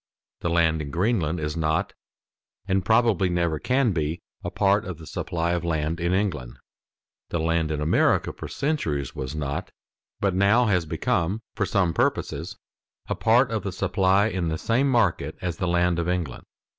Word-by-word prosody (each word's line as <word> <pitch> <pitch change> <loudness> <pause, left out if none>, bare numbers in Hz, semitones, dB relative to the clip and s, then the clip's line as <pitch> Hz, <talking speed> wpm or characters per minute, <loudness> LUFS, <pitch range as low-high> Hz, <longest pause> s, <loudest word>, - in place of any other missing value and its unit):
The 85 - -2
land 80 -2 +2
in 70 - -5
Greenland 85 -1 0
is 75 0 -3
not, 85 +5 0 0.7
and 95 -1 +1
probably 110 -2 +3
never 85 -3 0
can 125 - +2
be, 80 -1 -2 0.2
a - - -2
part 100 0 +2
of 90 -3 -6
the 80 - -11
supply 85 +1 -2
of 85 -1 -1
land 80 0 -1
in 85 +1 0
England. 90 -11 -1 0.7
The - - -1
land 80 0 +1
in 75 -1 -2
America 75 +2 +2
for - - -7
centuries 75 - -2
was 65 +3 -5
not, 70 -2 -3 0.5
but 100 -2 +1
now 100 +6 +4
has 90 -6 +1
become, 90 +7 -1
for 100 - -1
some 90 -4 +1
purposes, - - -1 0.5
a - - +1
part - - +3
of - - -1
the - - -4
supply 95 +1 +2
in 95 -5 -1
the 80 0 -1
same 125 - +1
market 95 - +1
as 85 -2 -3
the 90 - -1
land 85 0 +2
of 85 +1 -1
England. 85 -8 -3
85 Hz, 175 wpm, -25 LUFS, 80-100 Hz, 0.7 s, now